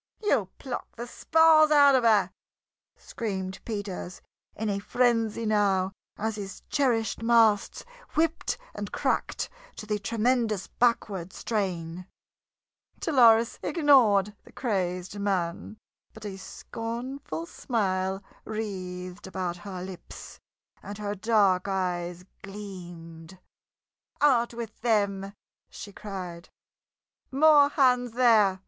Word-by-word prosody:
"You'll 220 - +2
pluck 255 -3 -6
the 235 - -6
spars 320 +4 +5
out 285 -2 +6
of 260 -2 +3
her!" 220 -3 +4 0.7
screamed 190 -4 -5
Peters, 200 -4 -5 0.4
in 220 - -3
a 200 -1 -1
frenzy 230 0 +1
now 200 -3 +2 0.3
as 220 0 -2
his 195 -2 -7
cherished 240 -7 +1
masts 225 -3 +3 0.3
whipped 320 +1 0 0.2
and - - -6
cracked - - -1 0.3
to - - -8
the 210 -1 -1
tremendous 225 -1 0
backward 205 -7 0
strain. 180 -5 -3 0.9
Dolores 235 -6 +4
ignored 240 - +4
the - - -17
crazed 185 -4 -2
man, 195 0 -2 0.4
but 215 -1 -10
a 200 -2 -5
scornful 240 - -6
smile 195 - -2 0.2
wreathed 185 -3 -6
about 185 -2 -3
her 185 0 -7
lips, 185 -1 -10 0.4
and 205 0 -8
her 205 -1 -3
dark 205 -3 +2
eyes 180 -2 -2 0.2
gleamed. 175 -4 -10 0.8
"Out 245 -5 +3
with 230 -2 -8
them!" 200 -4 0 0.4
she 205 - -10
cried. 180 -5 -7 0.8
"More 290 +1 +6
hands 250 -4 +2
there! 220 -6 +4
210 Hz, 105 wpm, -27 LUFS, 190-235 Hz, 0.9 s, out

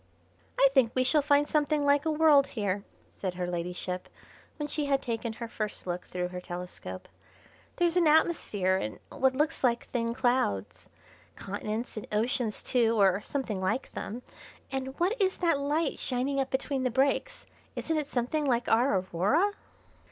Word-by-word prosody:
"I 275 - +7
think 260 -4 +3
we 255 - +3
shall 295 +4 +3
find 290 0 +3
something 300 -1 +1
like 285 +1 +3
a - - +2
world 300 -3 +5
here," 200 -3 -2 0.3
said 185 -2 -4
her 180 0 -2
ladyship, 180 +1 -4 0.5
when 295 -2 -3
she 295 0 -2
had 275 -1 +2
taken 230 -2 -3
her 235 +1 -6
first 215 -2 -5
look 180 0 -3
through 180 0 -3
her 180 0 -6
telescope; 175 - -7 0.7
"there's 345 0 +2
an 340 -3 +4
atmosphere 220 - +2
and 110 - -4
what 260 0 +2
look 300 +3 +2
like 240 -2 +2
thin 230 -1 -1
clouds. 245 - 0 0.5
Continents 215 +4 -4
and 215 - -5
oceans 220 +1 0
too, 230 -3 +2
or 195 0 +4
something 225 -7 -3
like 190 +8 -1
them, 240 +4 -6 0.5
and 265 +1 -4
what 365 +6 +2
is 380 -1 +2
that 335 -5 +2
light 290 +2 0
shining 265 +2 -1
up 270 -1 0
between 270 0 -1
the 255 - +1
breaks? 275 - 0 0.3
Isn't 320 - -1
it 295 - -4
something 285 +3 -1
like 245 -3 +1
our 235 -1 +3
Aurora?" 195 - +1
250 Hz, 165 wpm, -29 LUFS, 200-285 Hz, 0.7 s, I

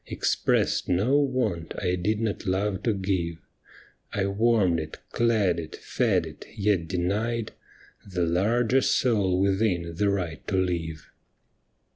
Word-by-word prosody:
Expressed - - +1
no 105 +10 +2
want 125 - -1
I 90 -2 0
did 105 +4 0
not 110 -4 -2
love 95 +1 0
to 115 - +1
give 95 -4 -1 0.4
— - - -29
I 95 - +2
warmed 100 -4 +2
it, 80 0 -6
clad 105 -7 +2
it, 80 -2 -7
fed - - 0
it, - - -10
yet 100 -5 +1
denied 105 +6 -1 0.5
The 90 -3 -1
larger 115 +9 +2
soul 100 -10 +2
within 95 -3 +1
the 100 +5 +1
right 90 -5 -3
to - - -1
live. 85 -3 -2
95 Hz, 135 wpm, -26 LUFS, 85-110 Hz, 0.5 s, no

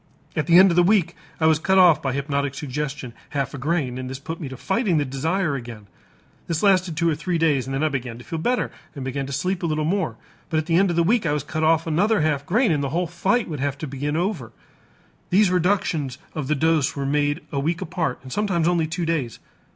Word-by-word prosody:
At 155 - -1
the 170 0 +6
end 190 0 +8
of - - 0
the 175 - +6
week 175 -2 +2 0.2
I 160 - +2
was 160 -1 +4
cut 190 +4 +2
off 180 -4 +6
by 135 - -1
hypnotic 140 0 -2
suggestion 140 -2 -4 0.2
half 135 -1 -1
a 140 - -6
grain 135 -3 -1
and 130 0 -5
this 130 - -5
put 160 +5 -7
me 145 - -5
to 130 - -8
fighting 190 - 0
the 145 - +1
desire 155 +5 -1
again. 115 -5 -7 0.6
This 165 +1 -2
lasted 185 -5 +3
two 170 - +2
or 165 - +3
three 170 +3 -2
days 145 -6 +1
and 135 - -3
then 135 - -1
I 155 - +3
began 125 -4 -4
to 120 - -11
feel 165 - -5
better 245 +9 0 0.2
and 135 -2 -6
began 135 +1 -3
to - - -7
sleep 185 +7 -1
a 170 - 0
little 155 -1 -1
more. 165 - 0 0.3
But 160 - 0
at 155 - 0
the 165 0 +1
end 195 +1 +4
of 170 - -1
the 170 - +3
week 205 +1 +2
I 145 - +1
was 150 -2 -1
cut 155 +1 -4
off 160 0 +3
another 190 +7 +2
half 150 -2 0
grain, 220 +5 +3
and 145 -2 +1
the 140 - -1
whole 175 +5 0
fight 190 +8 0
would 150 -4 -5
have 140 0 -1
to 155 - -5
be 135 -2 -8
begun 145 +2 -1
over. 170 - -2 0.8
These 195 0 +4
reductions 170 -7 0 0.2
of 150 -4 -4
the 150 - +1
dose 160 -2 +1
were 140 -1 -3
made 145 +3 0
a 140 - -1
week 160 +4 -1
apart 160 -6 -2
and 130 - -8
sometimes 185 -6 +1
only 170 -2 +2
two 170 +2 -3
days. 150 -9 -2
155 Hz, 255 wpm, -23 LUFS, 140-175 Hz, 0.8 s, end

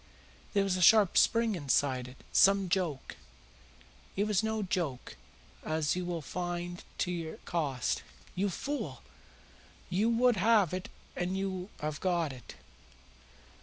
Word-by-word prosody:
There 200 -2 +3
was 190 -2 0
a - - -2
sharp 205 +1 +6
spring 230 -1 +4
inside 135 -5 +1
it. 125 +1 -12 0.2
Some 195 -1 +5
joke 170 -7 -2 0.5
" 60 +2 -26
"It 200 - +1
was 210 -1 +2
no 220 -1 -1
joke, 170 - -3 0.5
as 155 0 0
you 180 0 -2
will 170 -3 -3
find 175 +2 -4
to 180 - 0
your 165 -2 -4
cost. 145 -8 -1 0.3
You 200 +2 0
fool, 285 +10 -4 0.9
you 205 +6 +2
would 235 0 +3
have 205 -3 +4
it 185 0 -4 0.3
and 180 +2 -2
you 190 -1 -3
have 150 -1 -3
got 170 -6 0
it. 125 -3 -12
180 Hz, 140 wpm, -31 LUFS, 160-200 Hz, 0.9 s, sharp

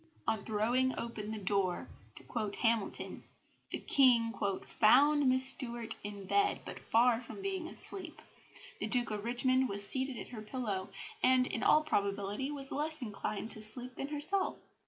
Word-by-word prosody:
On 215 -3 0
throwing 240 +5 0
open 220 -3 -5
the 220 - -4
door, 195 -2 -1 0.3
to - - -11
quote 215 -4 -3
Hamilton, 225 -3 -1 0.5
the - - -3
King 240 -4 +4 0.3
"found 280 +5 +4
Miss 260 0 +9
Stuart 235 -4 -1
in 205 -1 -7
bed, 405 - +1
but - - -8
far 235 +1 +2
from 255 +10 -10
being 380 -4 -3
asleep. 345 -1 -6 0.6
The - - -2
Duke 245 -3 -1
of 210 -1 -4
Richmond 255 +2 +1
was 200 0 -1
seated 260 0 -2
at - - -8
her 230 -3 -8
pillow, 210 -4 -4 0.3
and 255 0 +4
in 225 - -4
all 305 - +4
probability 200 0 -2
was 275 -2 -7
less 305 0 -2
inclined 215 0 -5
to 215 - -5
sleep 245 +4 -2
than 275 - -5
herself. 300 +7 +2
240 Hz, 160 wpm, -32 LUFS, 215-270 Hz, 0.6 s, Miss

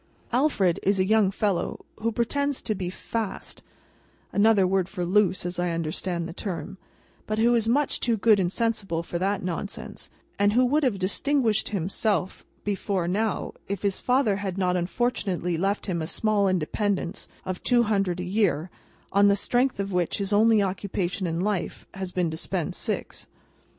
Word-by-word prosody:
Alfred 205 - +2
is 195 0 +2
a 185 - +3
young 215 -1 +4
fellow 195 -2 -1
who 230 +1 0
pretends 280 +5 -1
to 220 - 0
be 185 -3 -3
"fast" 220 +3 -5 0.7
(another 205 -2 +5
word 190 0 +1
for 180 -4 -3
loose, 185 -1 +2
as 175 0 -3
I 175 0 +1
understand 170 +1 -2
the 170 - -7
term), 195 0 -5 0.5
but 215 - -1
who 235 +2 +4
is 225 -1 +2
much 285 +4 +1
too 230 -2 +1
good 215 0 +5
and 180 -2 +1
sensible 200 -7 -1
for 170 0 -4
that 195 +2 0
nonsense, 185 +3 -5 0.3
and 205 0 +4
who 250 +2 +4
would 290 +5 +2
have 250 -8 +1
distinguished 220 +4 +1
himself 195 0 -1 0.2
before 195 -3 -1
now, 210 +3 -1
if 200 0 -4
his 200 -2 0
father 250 -6 +2
had 195 -2 -4
not 180 -1 +1
unfortunately 180 -2 -1
left 195 +5 0
him 175 -4 -2
a 160 - -3
small 205 +1 +1
independence 190 +2 -1 0.2
of 185 -1 -4
two 240 -1 +4
hundred 195 -5 0
a - - -2
year, 180 -3 0 0.4
on 200 +1 +6
the 200 - +5
strength 245 +4 +1
of 200 -1 -2
which 180 -2 0
his 200 0 -2
only 215 0 +5
occupation 185 -1 -2
in 165 0 -2
life 195 -1 -2
has 190 -1 -5
been 180 -3 0
to 160 - -5
spend 180 -1 -2
six. - - -4
195 Hz, 175 wpm, -26 LUFS, 180-220 Hz, 0.7 s, on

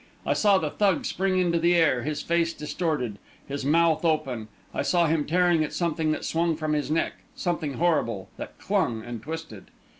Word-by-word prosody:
I - - +2
saw 205 -2 +4
the 155 -5 -2
Thug 200 -4 +1
spring 190 0 0
into 175 -2 +2
the 170 +1 +3
air, 160 -7 +3
his 150 +3 -3
face 170 0 +1
distorted, 150 - -2 0.3
his 140 0 -4
mouth 160 +3 +3
open 135 -9 0 0.3
I - - -1
saw 175 -1 +2
him 155 -2 +1
tearing 175 -1 +3
at 150 - -4
something 160 -2 0
that - - -3
swung 165 0 +1
from 155 -1 -2
his 145 -3 -1
neck 160 +2 0 0.2
something 170 -5 -2
horrible, 115 - 0
that - - -8
clung 115 -2 0
and 120 -2 -6
twisted.... 160 - -7
160 Hz, 185 wpm, -26 LUFS, 145-170 Hz, 0.3 s, saw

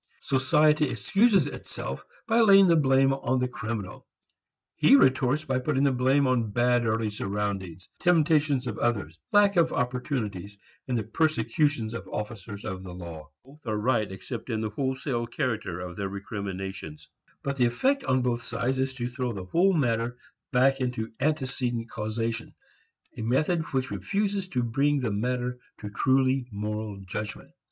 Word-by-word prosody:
Society 150 +3 +3
excuses 195 - +3
itself - - -6 0.2
by 230 +1 +3
laying 195 -4 +7
the 170 - +5
blame 135 -2 +4
on 130 -1 0
the 125 - +1
criminal; 110 -5 -6 0.7
he - - +6
retorts 130 +2 +3
by 130 -3 0
putting 135 +1 0
the 140 - +4
blame 130 +2 +3
on 125 -4 +1
bad 120 +2 +2
early 110 -1 0
surroundings, 100 -4 -4
the - - -18
temptations 155 -5 +3
of 115 -4 -4
others, 100 -9 -1
lack 205 -2 +5
of 170 -1 +4
opportunities, 115 -6 -3 0.3
and 125 -2 0
the 110 - -1
persecutions 120 -1 0
of 115 - -6
officers 105 -1 -6
of 95 -1 -4
the 90 -2 -8
law. 85 -3 -9 0.2
Both 140 0 -18
are 110 -1 0
right, 110 -2 +1
except 115 +6 -7
in 110 -2 -1
the 110 -1 -2
wholesale 130 -1 -2
character 110 -7 -2
of 90 -1 -7
their 100 -1 -2
recriminations. 95 -5 -6 0.4
But 140 0 -2
the 125 - +4
effect 270 - +1
on 130 -1 +2
both 120 -1 0
sides 120 +3 -2
is 130 0 -1
to 120 -2 -3
throw 125 -1 -3
the 95 -3 -6
whole 180 - +3
matter 120 -5 0 0.3
back 135 +1 +3
into 125 -3 -2
antecedent 130 -5 -1
causation, 115 +2 -3 0.6
a - - -6
method 150 +9 +1
which 130 -1 -1
refuses 195 - -1
to 125 -9 -1
bring 140 +5 +1
the 115 -4 -1
matter 125 +3 -2 0.2
to 105 -1 -6
truly 130 +2 +2
moral 105 0 -4
judgment. 105 +3 -6
125 Hz, 160 wpm, -27 LUFS, 105-135 Hz, 0.7 s, laying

